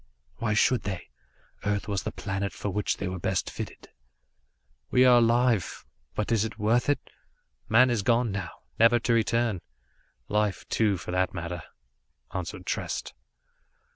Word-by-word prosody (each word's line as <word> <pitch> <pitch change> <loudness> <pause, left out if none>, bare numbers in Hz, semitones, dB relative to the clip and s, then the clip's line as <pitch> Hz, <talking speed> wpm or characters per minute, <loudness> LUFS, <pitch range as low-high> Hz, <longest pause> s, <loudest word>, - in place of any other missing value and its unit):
"Why 110 -2 0
should 125 +3 +3
they? 95 -3 -5 0.5
Earth 105 -1 -1
was 100 -2 -1
the - - -4
planet 100 0 -3
for 100 - -4
which 105 +2 -1
they 100 - -3
were 90 0 -4
best 95 +2 -1
fitted." - - -7 1.0
"We 125 0 +5
are 125 -1 +7
alive 120 - +2 0.3
but 105 +2 -1
is 110 -3 +3
it 110 -1 -5
worth 115 +5 +2
it? 145 - +3 0.7
Man 125 +3 +6
is 115 -3 +1
gone 120 +1 +2
now, 95 -3 -3 0.3
never 115 +2 +6
to 120 0 +1
return. 115 -3 +1 0.7
Life, 105 -2 0
too, 105 -4 +2
for 85 - -6
that 90 +1 0
matter," 85 0 -4 0.7
answered 90 -3 -5
Trest. - - -3
105 Hz, 150 wpm, -27 LUFS, 95-115 Hz, 1.0 s, are